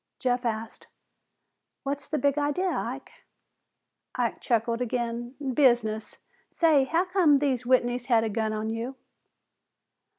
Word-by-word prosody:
Jeff 250 Hz, 0 st, 0 dB
asked, 220 Hz, 0 st, -5 dB, 1.0 s
"What's 280 Hz, 0 st, -3 dB
the 305 Hz, -, -1 dB
big 285 Hz, -1 st, +2 dB
idea, 300 Hz, +6 st, 0 dB
Ike?" -, -, -4 dB, 1.0 s
Ike -, -, -1 dB
chuckled 230 Hz, 0 st, 0 dB
again. 240 Hz, +1 st, -3 dB, 0.2 s
"Business! 235 Hz, -5 st, +2 dB, 0.3 s
Say, 310 Hz, -5 st, +3 dB
how 330 Hz, +7 st, +1 dB
come 360 Hz, -6 st, +4 dB
these 265 Hz, -4 st, 0 dB
Whitneys 245 Hz, -1 st, +2 dB
had 230 Hz, -3 st, +4 dB
a 225 Hz, -, -1 dB
gun 220 Hz, +1 st, -1 dB
on 215 Hz, +1 st, -2 dB
you?" 235 Hz, +4 st, -4 dB
245 Hz, 125 wpm, -27 LUFS, 230-285 Hz, 1.0 s, come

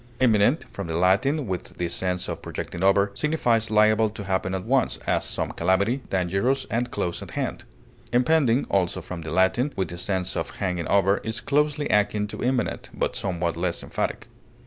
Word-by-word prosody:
Imminent, 120 Hz, +4 st, +3 dB
from 100 Hz, -3 st, -5 dB
the 80 Hz, 0 st, -2 dB
Latin, 130 Hz, -, +2 dB
with 95 Hz, -4 st, -5 dB
the 90 Hz, -, -1 dB
sense 90 Hz, +1 st, -1 dB
of -, -, -5 dB
projecting 85 Hz, -, -6 dB
over, 100 Hz, +1 st, +4 dB
signifies 120 Hz, -6 st, +1 dB
liable 110 Hz, +1 st, +4 dB
to 105 Hz, -1 st, -8 dB
happen 95 Hz, -1 st, -1 dB
at 95 Hz, -, -4 dB
once, -, -, +2 dB
as -, -, +1 dB
some -, -, -2 dB
calamity, 100 Hz, +8 st, +1 dB
dangerous 95 Hz, +9 st, 0 dB
and 120 Hz, +2 st, 0 dB
close 85 Hz, -7 st, -3 dB
at -, -, -8 dB
hand. -, -, -3 dB, 0.5 s
Impending, 125 Hz, 0 st, +3 dB
also 95 Hz, -3 st, 0 dB
from 90 Hz, -2 st, -7 dB
the 80 Hz, -, -6 dB
Latin, 95 Hz, -, +2 dB
with 95 Hz, -, -1 dB
the 85 Hz, -, -6 dB
sense 95 Hz, -1 st, -1 dB
of -, -, -3 dB
hanging 90 Hz, -4 st, -2 dB
over, 100 Hz, 0 st, +3 dB
is 110 Hz, 0 st, -4 dB
closely 150 Hz, +1 st, +1 dB
akin 105 Hz, 0 st, +2 dB
to 105 Hz, -, -6 dB
imminent, 125 Hz, 0 st, -1 dB
but -, -, -1 dB
somewhat 85 Hz, -3 st, -1 dB
less 85 Hz, 0 st, -1 dB
emphatic. -, -, -3 dB
100 Hz, 180 wpm, -25 LUFS, 90-120 Hz, 0.5 s, over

